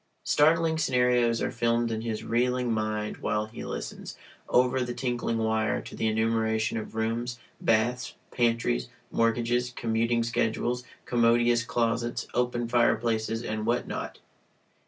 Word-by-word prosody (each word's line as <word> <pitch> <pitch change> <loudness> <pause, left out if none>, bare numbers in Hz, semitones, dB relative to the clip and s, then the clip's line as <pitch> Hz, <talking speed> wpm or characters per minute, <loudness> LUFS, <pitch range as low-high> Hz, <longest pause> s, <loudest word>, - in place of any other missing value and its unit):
Startling 160 +1 +3
scenarios 125 -4 +2
are - - -1
filmed 115 0 +1
in 110 0 -2
his 110 -2 -3
reeling 125 0 +1
mind 110 -1 -2
while 105 0 -1
he 110 +2 -9
listens, - - -6 0.3
over 125 +1 +3
the 120 -1 -3
tinkling 120 -3 -1
wire, 110 -1 +1
to - - -9
the 110 - 0
enumeration 110 0 +1
of 110 - -8
rooms, 115 +2 -2 0.2
baths, 120 +3 +1 0.2
pantries, 115 - +1 0.2
mortgages, 120 +2 +1
commuting 115 +1 +1
schedules, 115 +2 -1 0.2
commodious 120 0 +3
closets, 115 0 -1
open 120 -1 0
fireplaces, 115 -1 +1
and 110 0 -3
what 120 +1 +1
not. - - -5
115 Hz, 130 wpm, -28 LUFS, 110-120 Hz, 0.3 s, Startling